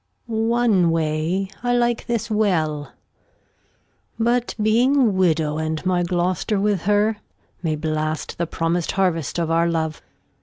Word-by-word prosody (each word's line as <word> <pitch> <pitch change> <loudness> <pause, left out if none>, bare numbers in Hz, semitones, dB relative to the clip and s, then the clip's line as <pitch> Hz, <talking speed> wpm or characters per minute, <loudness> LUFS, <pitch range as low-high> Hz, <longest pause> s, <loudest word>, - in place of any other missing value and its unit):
Gon. 225 -1 -1
One 230 -7 +3
Way 165 +4 0
I 245 0 +1
like 240 -1 0
this 235 -1 -2
well; 160 -9 0 1.3
But 240 +1 0
being 230 +6 +3
a 275 - +5
Widow, 165 -7 +1
and 160 +2 -3
my 180 -1 +2
Gloster 180 +3 0
with 200 -3 +1
her, 210 +1 +2 0.4
May 160 -3 -1
blast 155 +1 -3
the 170 - 0
promis'd 165 +1 -1
Harvest 175 -7 0
of 165 -1 -1
our 165 +1 +2
Love. 160 -2 -2
180 Hz, 140 wpm, -22 LUFS, 160-220 Hz, 1.3 s, a